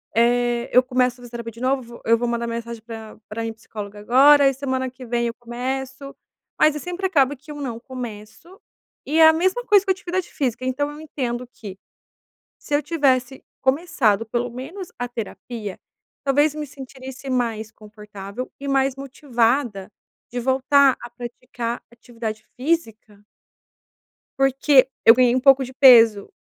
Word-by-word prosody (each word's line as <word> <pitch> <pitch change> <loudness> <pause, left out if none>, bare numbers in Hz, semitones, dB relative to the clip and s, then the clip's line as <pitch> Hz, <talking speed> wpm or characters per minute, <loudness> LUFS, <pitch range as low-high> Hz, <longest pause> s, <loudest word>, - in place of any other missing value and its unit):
eh, 240 0 +2
eu 250 - +9
começo 250 -1 +1
a 245 - -16
fazer 240 - -12
terapia 235 -1 -6
de 230 - -13
novo, 255 -2 -2
eu 230 0 +4
vou 240 +1 -2
mandar 235 0 -2
mensagem 230 -1 -5
pra 225 -2 -9
pra 225 +2 -5
minha 225 0 -4
psicóloga 210 -2 -9
agora 275 +6 +6
e - - -2
semana 260 -1 -2
que 255 0 -12
vem 235 0 -1
eu 230 - -3
começo", 265 +3 -5 0.5
mas 305 -1 +4
sempre 360 +2 -4
acaba 285 -6 +2
que 300 +3 -21
eu - - -7
não 235 -4 -4
começo 250 - -9 0.5
e 305 +3 -1
é 320 - +9
a 320 - +7
mesma 375 +9 0
coisa 405 -2 +4
que 380 - +2
a - - +4
atividade 365 0 -4
física, 255 -2 -2
então 285 +3 -1
eu 295 - -10
entendo 250 -5 -4
que, 205 -5 -11 0.8
se 290 - -2
eu 290 - +2
tivesse 265 -5 0 0.2
começado 265 - +1
pelo 240 +2 -2
menos 325 +10 -8
a 245 - -2
terapia 225 -2 -7 0.4
talvez 290 +2 +2
me 300 -1 -5
sentiria 265 0 -10
mais 225 -3 -1
confortável 210 +1 -9
e 280 - -6
mais 270 -1 +1
motivada 245 -6 -1 0.4
de 245 - -3
voltar 265 +2 +3
a 240 - -8
praticar 240 0 -6
atividade 230 -3 -7
física. 225 -8 -3 1.2
Porque 270 0 +4 0.2
eu 225 - +10
ganhei 250 -1 +3
um 255 - +2
pouco 270 -1 +5
de 260 - -11
peso 230 -6 +6
250 Hz, 165 wpm, -22 LUFS, 230-275 Hz, 1.2 s, eu